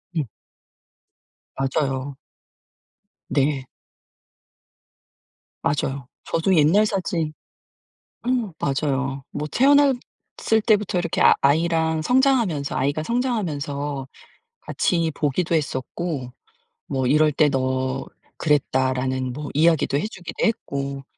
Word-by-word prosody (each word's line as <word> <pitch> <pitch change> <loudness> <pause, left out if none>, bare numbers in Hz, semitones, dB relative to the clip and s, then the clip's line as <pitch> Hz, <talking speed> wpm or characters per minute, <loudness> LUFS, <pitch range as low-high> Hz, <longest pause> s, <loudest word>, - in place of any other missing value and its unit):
음. 155 - 0 1.3
맞아요. 135 0 -1 1.1
네. 140 -1 +1 2.0
맞아요. 135 -2 -1 0.2
저도 180 +3 +1
옛날 165 +7 +5
사진 175 -6 -1 0.9
응 245 -6 0
맞아요. 135 -1 -1
뭐 150 +1 -4
태어났을 270 -4 +2
때부터 210 -5 +2
이렇게 170 -2 -1
아 - - +7
아이랑 160 +2 +2
성장하면서 240 - +2
아이가 145 +3 0
성장하면서 145 - -2 0.5
같이 165 -2 0
보기도 160 +4 0
했었고 140 -1 -3 0.6
뭐 130 -1 -1
"이럴 150 +2 +4
때 150 +1 +3
너 130 0 -1 0.3
그랬다."라는 130 -3 0
뭐 145 +2 -6
이야기도 160 -2 +3
해 160 - -1
주기도 180 -5 -4
했고 140 -10 -2
150 Hz, 215 characters per minute, -23 LUFS, 135-175 Hz, 2.0 s, 아